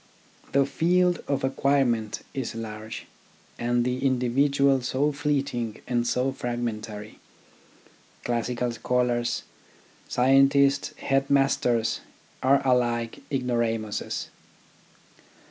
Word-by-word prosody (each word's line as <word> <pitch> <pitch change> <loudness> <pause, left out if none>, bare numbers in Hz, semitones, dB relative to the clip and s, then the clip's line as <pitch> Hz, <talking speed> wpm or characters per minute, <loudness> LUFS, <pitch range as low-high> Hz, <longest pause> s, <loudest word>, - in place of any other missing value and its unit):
The 140 0 +4
field 175 +4 +2
of 140 -2 -1
acquirement 135 -5 +1
is 130 -4 -4
large, 110 -1 -6 0.5
and 120 0 +1
the 125 +1 -1
individual 135 +1 +2
so 135 +4 0
fleeting 140 -6 -2
and 120 -1 0
so 125 +2 +1
fragmentary: 115 -4 -5 1.0
classical 120 +1 -1
scholars, 120 0 0 0.6
scientists, 135 +2 +4
headmasters 135 -4 +1 0.4
are 135 +1 +3
alike 120 -2 +1
ignoramuses. 115 -5 -1
125 Hz, 80 wpm, -26 LUFS, 120-135 Hz, 1.0 s, The